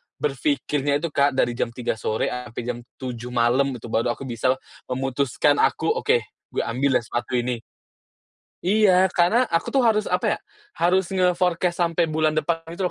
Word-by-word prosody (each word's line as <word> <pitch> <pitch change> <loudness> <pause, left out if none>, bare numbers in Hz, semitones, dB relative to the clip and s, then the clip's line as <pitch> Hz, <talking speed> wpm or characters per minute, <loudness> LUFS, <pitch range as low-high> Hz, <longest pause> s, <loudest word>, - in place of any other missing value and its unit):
berpikirnya 150 - 0
itu 165 - -2
Kak, 140 -1 +2
dari 120 -2 +2
jam 120 - -1
3.00 120 -3 -2
sore 110 +2 -1
sampai 125 -1 -5
jam 120 0 -4 0.2
7.00 125 -2 -6
malam, 125 +3 +2
gitu, 115 -1 -9
baru 120 +1 +1
aku - - -9
bisa 130 +1 0 0.3
memutuskan 135 +2 +1
aku, - - +2
"Oke, 470 0 +1 0.3
gue - - +1
ambil 130 +3 0
ya, - - +2
sepatu 120 +2 -3
ini." 120 -1 -1 1.1
Iya! 190 -2 +5
Karena, 220 +9 +3
aku 165 0 0
tuh, 270 -2 +3
harus, 215 -1 +3
apa - - +1
ya, - - -9 0.4
harus 180 +1 +2
nge-forecast 180 -1 +1
sampai 170 -1 +1
bulan 155 0 +1
depan 165 +2 0 0.2
gitu 180 -1 -1
145 Hz, 165 wpm, -23 LUFS, 125-180 Hz, 1.1 s, Iya